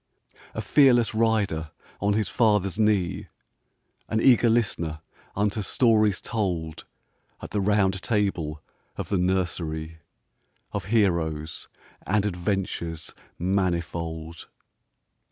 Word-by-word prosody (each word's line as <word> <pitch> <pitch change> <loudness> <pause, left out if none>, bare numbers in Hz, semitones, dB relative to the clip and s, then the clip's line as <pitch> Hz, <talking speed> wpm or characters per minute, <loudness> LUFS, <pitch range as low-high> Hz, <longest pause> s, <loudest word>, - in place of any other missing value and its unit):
A 110 - -3
fearless 120 -1 +4
rider 105 -8 +1 0.3
on 100 +1 +1
his 105 -2 +1
father's 105 -4 +1
knee, 105 -5 +1 0.8
An 110 - +1
eager 120 -1 +5
listener 85 -9 0 0.4
unto 105 +1 0
stories 110 -2 +3
told 90 -8 -3 0.5
At - - -9
the 105 - 0
Round 95 -2 +2
Table 90 -9 -1 0.3
of - - -5
the 100 - +1
nursery, 85 -3 -1 0.7
Of - - -4
heroes 85 -8 0 0.4
and 105 0 +2
adventures 90 -4 -3 0.2
manifold. 85 -3 -2
95 Hz, 100 wpm, -25 LUFS, 85-105 Hz, 0.8 s, eager